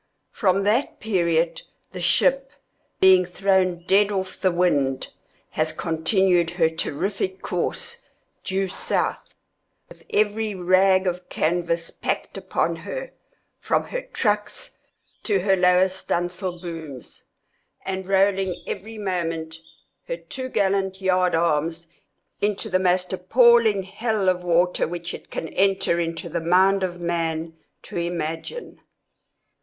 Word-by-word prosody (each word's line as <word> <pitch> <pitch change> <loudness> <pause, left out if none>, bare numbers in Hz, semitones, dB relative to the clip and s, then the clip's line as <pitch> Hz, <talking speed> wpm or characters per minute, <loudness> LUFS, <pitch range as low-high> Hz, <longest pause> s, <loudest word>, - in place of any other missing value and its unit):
From 195 -1 +1
that 220 +7 +1
period 170 -5 +1 0.3
the 180 - -7
ship, 270 +9 +2 0.5
being 190 -1 +7
thrown 185 -1 +1
dead 200 +2 +4
off 190 -2 -4
the 185 - +3
wind, 145 -7 +1 0.4
has 155 0 0
continued 170 +2 +1
her 160 -2 +3
terrific 190 +4 -2
course 470 - -3 0.4
due 190 0 -1
south, 185 - -2 0.5
with - - -15
every 215 0 0
rag 185 +1 +3
of 180 0 -3
canvas 170 0 -1
packed - - -3
upon - - -1
her, - - -6 0.5
from - - 0
her - - -3
trucks 210 - -2 0.4
to 200 -4 +1
her 195 +1 +3
lower 180 0 +4
studding 175 -2 -2
sail 180 -1 -4
booms, 160 -7 -9 0.6
and 190 -1 -4
rolling 195 -1 +2
every 220 +2 -6
moment 165 -5 -3 0.5
her - - -3
top 260 - -7
gallant 190 -1 +1
yard 185 -2 +2
arms 165 0 0 0.5
into 210 +1 -1
the 185 - +3
most 180 0 +1
appalling 220 +1 +4
hell 215 0 -1
of 180 -1 0
water 175 +1 +2
which 170 +1 -5
it - - -10
can 160 - -4
enter 190 -3 +2
into 165 0 -3
the 170 0 -3
mind 190 +4 +4
of 185 -2 -2
a - - -13
man 165 -1 -2 0.3
to - - -8
imagine. 170 - -4
185 Hz, 130 wpm, -23 LUFS, 170-195 Hz, 0.6 s, being